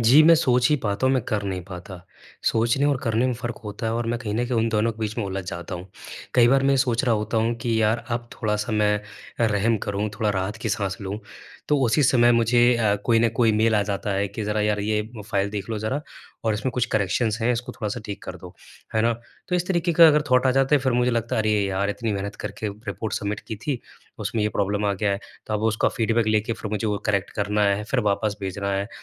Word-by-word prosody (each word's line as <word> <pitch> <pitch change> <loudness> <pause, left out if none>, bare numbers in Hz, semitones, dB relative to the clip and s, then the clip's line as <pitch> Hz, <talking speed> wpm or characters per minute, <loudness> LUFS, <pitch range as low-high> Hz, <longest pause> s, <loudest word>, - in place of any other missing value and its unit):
जी, 125 +7 +7
मैं 165 +1 +8
सोच 125 -5 +3
ही - - +5
पाता 100 +5 0
हूँ, 130 - +3
मैं 130 - +1
कर 105 -2 0
नहीं 95 -2 -3
पाता। 90 0 -9 0.5
सोचने 120 +5 +1
और 145 -2 +2
करने 115 +2 +2
में 125 - +1
फ़र्क 120 -1 -5
होता 105 +2 -5
है 110 - 0
और 120 0 -1
मैं 120 0 -1
कहीं 105 -3 -3
न 120 +2 +1
कहीं 120 -2 0
उन 115 +1 +2
दोनों 110 +1 +1
के 110 - -19
बीच 110 +1 -3
में 110 - -1
उलझ 95 -1 -4
जाता 85 +1 -6
हूँ। 90 +2 -8 0.5
कई 120 -1 +6
बार 135 +1 +4
मैं 140 - +3
ये - - +3
सोच 125 -1 +1
रहा 120 -3 +3
होता 105 +2 -2
हूँ 115 +1 +2
कि 115 -2 +1
यार 110 +2 +1
अब 120 0 -3
थोड़ा-सा 105 +1 -1
मैं 105 -1 +2 0.4
रहम 110 0 +2
करूँ, 100 +1 -1
थोड़ा 105 -2 +1
राहत 95 +2 -2
की - - -1
साँस 100 0 -2
लूँ। 100 +1 -4 0.5
तो 150 -1 +3
उसी 130 +6 +3
समय 120 -2 +5
मुझे 120 +1 +4
अ, 105 -3 +2
कोई 115 -2 +4
न 115 - +4
कोई 115 -3 +4
मेल 110 +1 +3
आ 105 - +3
जाता 100 0 -3
है 100 0 0
कि 110 - -5
ज़रा 105 0 0
यार 105 -1 +1
ये 105 +1 0 0.3
फाइल 100 0 0
देख 100 0 -5
लो 110 - -2
ज़रा 110 +7 -2 0.4
और 110 -2 +2
इसमें 125 +5 -2
कुछ 125 -2 +1
करेक्शंस 110 +2 +1
हैं 120 +2 +2
इसको 125 +1 -4
थोड़ा-सा 105 +2 -4
ठीक 100 - -6
कर 90 - -6
दो, 90 0 -12 0.4
है 110 - +3
ना? 115 0 +3 0.4
तो 180 - 0
इस 180 0 -1
तरीके 170 -2 +1
का 165 0 +8
अगर 150 0 +4
थाॅट 125 +1 +4
आ - - +4
जाता 135 +2 +3
है - - +5
फिर 130 -2 +1
मुझे 125 +1 +2
लगता 115 -1 -1
है - - +2
अरे 110 - +1
यार! 100 +1 0
इतनी 110 0 -2
मेहनत 100 +1 -4
करके 110 - -4
रिपोर्ट 105 0 -6
सबमिट 105 +1 -3
की 110 - -4
थी, 125 +2 -3 0.4
उसमें 110 - -2
ये 105 - +2
प्रॉब्लम 105 0 -1
आ 100 - +2
गया 100 +1 0
है। 100 - 0 0.3
तो 110 - -2
अब 105 - -1
उसका 110 0 +2
फ़ीडबैक 115 -1 0
लेके 110 +1 +1
फिर 110 -2 -6
मुझे 110 +1 -1
वो 105 -1 0
करेक्ट 100 -2 0
करना 105 0 0
है, 100 +1 +1
फिर 125 +2 0
वापस 105 0 0
भेजना 100 +1 -3
है। 100 +2 -1
110 Hz, 260 wpm, -24 LUFS, 105-120 Hz, 0.5 s, मैं